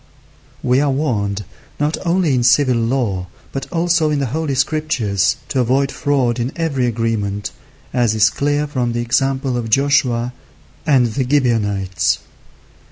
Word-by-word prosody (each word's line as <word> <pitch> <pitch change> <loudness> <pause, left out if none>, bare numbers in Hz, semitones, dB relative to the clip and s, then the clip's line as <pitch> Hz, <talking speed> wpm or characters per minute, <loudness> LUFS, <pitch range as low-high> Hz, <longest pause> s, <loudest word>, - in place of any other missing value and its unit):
We 125 +2 +3
are 145 - +2
warned 105 -8 -1 0.3
not 150 +2 +1
only 175 -4 +2
in 125 - +2
civil 125 +1 +4
law, 115 -6 -1 0.2
but 135 - -5
also 170 -2 +2
in 150 - 0
the 140 - 0
holy 155 -3 -1
Scriptures, 125 - +1
to 135 - 0
avoid 130 +3 +2
fraud 130 -5 0
in 120 +3 -1
every 140 -7 0
agreement, 110 -3 -2 0.4
as 120 -3 +2
is 110 0 +4
clear 145 +1 0
from 125 -5 -2
the 120 - -1
example 130 +1 0
of 115 -2 -3
Joshua 125 -2 +2 0.5
and 135 -5 +4
the 135 - 0
Gibeonites. 105 - +1
130 Hz, 145 wpm, -18 LUFS, 115-145 Hz, 0.5 s, civil